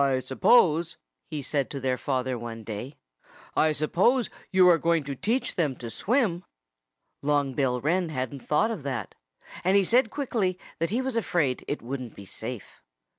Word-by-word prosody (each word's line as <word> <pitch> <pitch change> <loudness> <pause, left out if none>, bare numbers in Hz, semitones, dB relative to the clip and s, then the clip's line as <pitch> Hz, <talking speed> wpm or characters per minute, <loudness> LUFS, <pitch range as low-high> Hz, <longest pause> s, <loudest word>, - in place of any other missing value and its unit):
"I 135 -1 +2
suppose 160 - +3 0.2
" - - -49
he 150 -3 -4
said 140 -2 -1
to 140 - -5
their 130 -1 0
father 130 -1 -1
one 115 -1 -6
day 110 +6 -6 0.6
"I 155 - +4
suppose 185 - +2 0.2
you 185 -1 +6
are 170 -2 +6
going 165 -1 +2
to 140 0 -4
teach 230 - -1
them 150 -7 0
to 115 -2 -7
swim?" 200 - +1 0.8
Long 145 -2 +1
Bill 125 -2 +1
Wren 170 +5 +1
hadn't 130 -2 -3
thought 150 - +1
of 210 -8 -4
that. 135 -3 -4 0.5
And 190 +3 +4
he 200 - +5
said 230 +4 +3
quickly 220 -10 -1 0.2
that 165 0 0
he 240 +6 0
was 260 -2 -2
afraid 170 - 0
it 145 - -3
wouldn't 125 -1 -5
be 100 - -10
safe. 110 +3 -8
150 Hz, 175 wpm, -27 LUFS, 130-185 Hz, 0.8 s, you